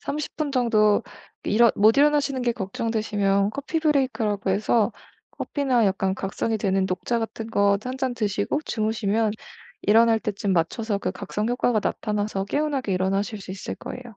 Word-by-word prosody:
30 300 Hz, +1 st, -4 dB
분 305 Hz, -2 st, -1 dB
정도 215 Hz, -5 st, +3 dB, 0.4 s
일어 235 Hz, +3 st, +5 dB
못 215 Hz, +5 st, +5 dB
일어나시는 285 Hz, -2 st, +3 dB
게 240 Hz, -1 st, +1 dB
걱정되시면 205 Hz, -1 st, 0 dB
커피 285 Hz, +6 st, -3 dB
브레이크라고 255 Hz, -10 st, +1 dB
해서 215 Hz, +3 st, +2 dB, 0.4 s
커피나 255 Hz, -6 st, 0 dB
약간 190 Hz, 0 st, 0 dB
각성이 215 Hz, +3 st, -2 dB
되는 195 Hz, -2 st, +1 dB
녹차 190 Hz, +6 st, -1 dB
같은 225 Hz, 0 st, -5 dB
거 200 Hz, -2 st, +3 dB
1 255 Hz, +1 st, -4 dB
잔 260 Hz, -2 st, -1 dB
드시고 210 Hz, +5 st, -1 dB
주무시면 215 Hz, -1 st, 0 dB, 0.5 s
일어날 225 Hz, +1 st, +5 dB
때쯤 205 Hz, -3 st, -2 dB
맞춰서 200 Hz, +5 st, 0 dB
그 -, -, -2 dB
각성 210 Hz, +3 st, -3 dB
효과가 245 Hz, -2 st, +1 dB
나타나서 210 Hz, -2 st, -2 dB
개운하게 280 Hz, -3 st, -1 dB
일어나실 195 Hz, +3 st, -1 dB
수 190 Hz, -, -9 dB
있을 190 Hz, 0 st, -5 dB
거예요. 255 Hz, -, -8 dB
220 Hz, 345 characters per minute, -24 LUFS, 200-245 Hz, 0.5 s, 일어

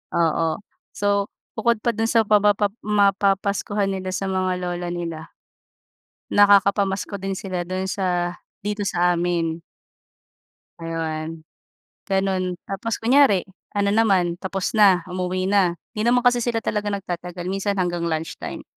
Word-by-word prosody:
oo. 165 Hz, -1 st, +1 dB, 0.4 s
So 200 Hz, 0 st, +1 dB, 0.3 s
bukod 235 Hz, +1 st, +1 dB
pa 235 Hz, -, +2 dB
dun 225 Hz, +1 st, 0 dB
sa 230 Hz, -2 st, +4 dB
mapapa 205 Hz, -1 st, +3 dB
mapapaskuhan 200 Hz, 0 st, +1 dB
nila 185 Hz, -1 st, -4 dB
sa 195 Hz, -, -2 dB
mga 185 Hz, -1 st, 0 dB
lola 175 Hz, -1 st, -3 dB
nila 165 Hz, -2 st, -5 dB, 1.0 s
nakakapamasko 200 Hz, 0 st, +3 dB
din 195 Hz, 0 st, -3 dB
sila 180 Hz, -2 st, -4 dB
dun 185 Hz, 0 st, -2 dB
sa, 175 Hz, -2 st, -1 dB, 0.2 s
dito 205 Hz, -1 st, -2 dB
sa 180 Hz, 0 st, +2 dB
amin. 170 Hz, -1 st, -1 dB, 1.2 s
Ayun, 160 Hz, -1 st, -4 dB, 0.6 s
ganun 190 Hz, -2 st, 0 dB
tapos 200 Hz, +4 st, -3 dB
kunyari 245 Hz, -5 st, +5 dB, 0.3 s
ano 200 Hz, 0 st, +2 dB
naman, 190 Hz, -6 st, +2 dB
tapos 190 Hz, 0 st, -2 dB
na 195 Hz, -5 st, +5 dB
umuwi 185 Hz, +1 st, -2 dB
na, 185 Hz, -4 st, +3 dB, 0.2 s
'di 215 Hz, +2 st, -1 dB
naman 245 Hz, +1 st, +3 dB
kasi 245 Hz, 0 st, +4 dB
sila 235 Hz, -1 st, -1 dB
talaga 210 Hz, -1 st, -1 dB
nagtatagal 180 Hz, -3 st, -4 dB
minsan 195 Hz, +1 st, -1 dB
hanggang 175 Hz, -2 st, -1 dB
lunch 160 Hz, 0 st, -3 dB
time. -, -, -6 dB
195 Hz, 130 wpm, -23 LUFS, 175-205 Hz, 1.2 s, kunyari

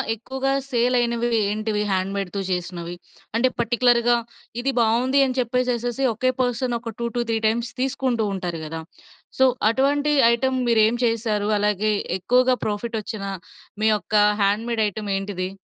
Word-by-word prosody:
ఎక్కువగా 265 Hz, +4 st, -2 dB, 0.2 s
సేల్ 245 Hz, 0 st, +2 dB
అయినవి 235 Hz, 0 st, 0 dB, 0.2 s
ఏంటివి 215 Hz, 0 st, -1 dB
హ్యాండ్‌మేడ్‌తో 195 Hz, +1 st, -2 dB
చేసినవి? 175 Hz, -1 st, -4 dB, 0.4 s
అంటే, 255 Hz, +2 st, +3 dB
పర్టిక్యులర్‌గా, 240 Hz, 0 st, +3 dB, 0.4 s
"ఇది 270 Hz, +2 st, 0 dB
బాగుంది" 250 Hz, +5 st, +3 dB
అని 260 Hz, 0 st, -3 dB
చెప్పేసేసేసి 245 Hz, +1 st, 0 dB
ఒకే 255 Hz, +4 st, +1 dB
పర్సన్ 245 Hz, 0 st, 0 dB
ఒక 230 Hz, -1 st, -7 dB
2-3 235 Hz, -1 st, -1 dB
టైమ్స్ 230 Hz, +1 st, -1 dB
తీసుకుంటూ 255 Hz, -3 st, 0 dB
ఉంటారు 175 Hz, -3 st, -4 dB
గదా! 160 Hz, +1 st, -5 dB, 0.6 s
సో, 265 Hz, -, +6 dB, 0.2 s
అటువంటి 285 Hz, +5 st, +1 dB, 0.2 s
ఐటెమ్ 260 Hz, +2 st, 0 dB
మీరేం 225 Hz, 0 st, +3 dB
చేశారు? 220 Hz, -3 st, 0 dB
అలాగే 210 Hz, +1 st, +1 dB, 0.2 s
ఎక్కువగా 250 Hz, +6 st, +3 dB
ప్రాఫిట్ 220 Hz, +2 st, -2 dB
వచ్చిన 210 Hz, -1 st, -6 dB, 0.6 s
మీ 220 Hz, -, +4 dB
యొక్క 205 Hz, +1 st, -7 dB, 0.3 s
హ్యాండ్‌మేడ్‌ 220 Hz, +3 st, +1 dB
ఐటెమ్ 205 Hz, 0 st, -5 dB
ఏంటిది? 195 Hz, -2 st, -4 dB
230 Hz, 130 wpm, -23 LUFS, 210-250 Hz, 0.6 s, సో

